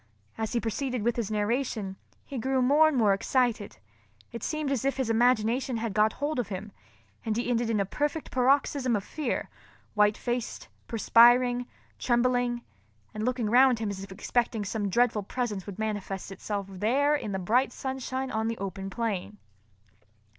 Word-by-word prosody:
As 220 Hz, +1 st, -3 dB
he 240 Hz, -, +2 dB
proceeded 245 Hz, +1 st, -2 dB
with 235 Hz, +1 st, +1 dB
his 230 Hz, -4 st, -2 dB
narration, 215 Hz, -2 st, -1 dB, 0.3 s
he 270 Hz, -, -5 dB
grew 260 Hz, +2 st, +1 dB
more 295 Hz, +5 st, +5 dB
and 305 Hz, -4 st, 0 dB
more 210 Hz, -4 st, +4 dB
excited. 230 Hz, 0 st, 0 dB, 0.5 s
It 235 Hz, -, -7 dB
seemed 310 Hz, -3 st, -2 dB
as 265 Hz, -4 st, 0 dB
if 275 Hz, 0 st, 0 dB
his 255 Hz, -4 st, 0 dB
imagination 240 Hz, +2 st, +2 dB
had 225 Hz, -2 st, -3 dB
got 215 Hz, +2 st, +3 dB
hold 290 Hz, -1 st, -2 dB
of 245 Hz, -, -1 dB
him, 200 Hz, +1 st, -6 dB, 0.5 s
and 220 Hz, -1 st, -1 dB
he 240 Hz, -, -1 dB
ended 235 Hz, -1 st, +1 dB
in 220 Hz, -2 st, +1 dB
a 200 Hz, -, +1 dB
perfect 295 Hz, -, -2 dB
paroxysm 260 Hz, -1 st, +2 dB
of 200 Hz, -, -2 dB
fear—white 210 Hz, -5 st, -2 dB
faced, 240 Hz, -1 st, -4 dB, 0.2 s
perspiring, 245 Hz, +2 st, +5 dB, 0.3 s
trembling, 245 Hz, 0 st, +1 dB, 0.5 s
and 215 Hz, -, -4 dB
looking 245 Hz, -2 st, 0 dB
round 250 Hz, +2 st, +5 dB
him 220 Hz, -2 st, -2 dB
as 195 Hz, -1 st, -6 dB
if 195 Hz, -, -10 dB
expecting 225 Hz, +2 st, -1 dB
that -, -, -6 dB
some 205 Hz, -3 st, -2 dB
dreadful 235 Hz, +1 st, +2 dB
presence 210 Hz, -2 st, -3 dB
would 200 Hz, -2 st, -7 dB
manifest 205 Hz, -3 st, -4 dB
itself 200 Hz, 0 st, -4 dB
there 235 Hz, +10 st, +1 dB
in 220 Hz, -8 st, -3 dB
the 190 Hz, -, -1 dB
bright 230 Hz, +8 st, +2 dB
sunshine 265 Hz, 0 st, -4 dB
on 220 Hz, 0 st, -1 dB
the 230 Hz, 0 st, -2 dB
open 195 Hz, 0 st, -5 dB
plain. 210 Hz, -2 st, -3 dB
235 Hz, 170 wpm, -28 LUFS, 210-255 Hz, 0.5 s, more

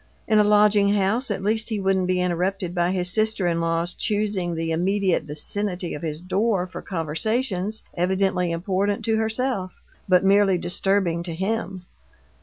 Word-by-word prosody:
In 215 Hz, -1 st, +4 dB
a -, -, +6 dB
lodging 205 Hz, -1 st, +4 dB
house, 215 Hz, +6 st, +1 dB
at 195 Hz, -2 st, -3 dB
least 220 Hz, +2 st, 0 dB
he 215 Hz, -2 st, -2 dB
wouldn't 190 Hz, -1 st, +1 dB
be 185 Hz, 0 st, +1 dB
interrupted 180 Hz, +1 st, -1 dB
by 175 Hz, -1 st, +1 dB
his 180 Hz, -1 st, -1 dB
sister 215 Hz, -1 st, 0 dB
in 170 Hz, -1 st, 0 dB
law's 165 Hz, +1 st, -1 dB
choosing 205 Hz, -5 st, -1 dB
the 165 Hz, 0 st, -2 dB
immediate 185 Hz, 0 st, +1 dB
vicinity 180 Hz, +4 st, -3 dB
of 150 Hz, -, -6 dB
his 155 Hz, -2 st, -4 dB
door 190 Hz, +2 st, 0 dB
for 185 Hz, -, -8 dB
conversations 195 Hz, -, -2 dB
evidently 185 Hz, 0 st, 0 dB
important 195 Hz, +4 st, -1 dB
to 225 Hz, -1 st, +2 dB
herself, 220 Hz, -3 st, -1 dB, 0.4 s
but 185 Hz, 0 st, +4 dB
merely 195 Hz, -1 st, +4 dB
disturbing 175 Hz, 0 st, 0 dB
to 170 Hz, -1 st, -5 dB
him. 190 Hz, -1 st, -3 dB
190 Hz, 160 wpm, -23 LUFS, 175-205 Hz, 0.4 s, a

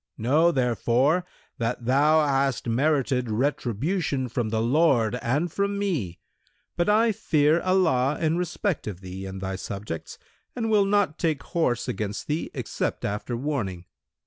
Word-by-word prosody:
Know, 150 Hz, +9 st, +3 dB
therefore, 130 Hz, +5 st, +1 dB, 0.3 s
that 115 Hz, +1 st, -2 dB
thou 150 Hz, +5 st, +4 dB
hast 135 Hz, -3 st, 0 dB
merited 130 Hz, 0 st, +1 dB
retribution 135 Hz, -, -1 dB
from 120 Hz, -2 st, -2 dB
the 110 Hz, 0 st, 0 dB
Lord 120 Hz, -2 st, +3 dB
and 145 Hz, +8 st, 0 dB
from 200 Hz, +2 st, -1 dB
me; 150 Hz, -, -2 dB, 0.6 s
but 175 Hz, +3 st, +1 dB
I 225 Hz, +2 st, +4 dB
fear 155 Hz, -4 st, +2 dB
Allah 160 Hz, -8 st, +2 dB
in 160 Hz, 0 st, +1 dB
respect 180 Hz, -, -2 dB
of 95 Hz, -3 st, -6 dB
thee 95 Hz, +1 st, -7 dB
and 95 Hz, 0 st, -7 dB
thy 95 Hz, 0 st, -3 dB
subjects[FN#176] 95 Hz, -2 st, -6 dB, 0.4 s
and 225 Hz, -3 st, -1 dB
will 205 Hz, -2 st, +4 dB
not 200 Hz, -5 st, +1 dB
take 155 Hz, -4 st, 0 dB
horse 125 Hz, -9 st, -1 dB
against 105 Hz, +1 st, -3 dB
thee 150 Hz, +2 st, -2 dB
except -, -, -3 dB
after 105 Hz, +4 st, -3 dB
warning. 115 Hz, -11 st, -3 dB
135 Hz, 145 wpm, -25 LUFS, 115-170 Hz, 0.6 s, thou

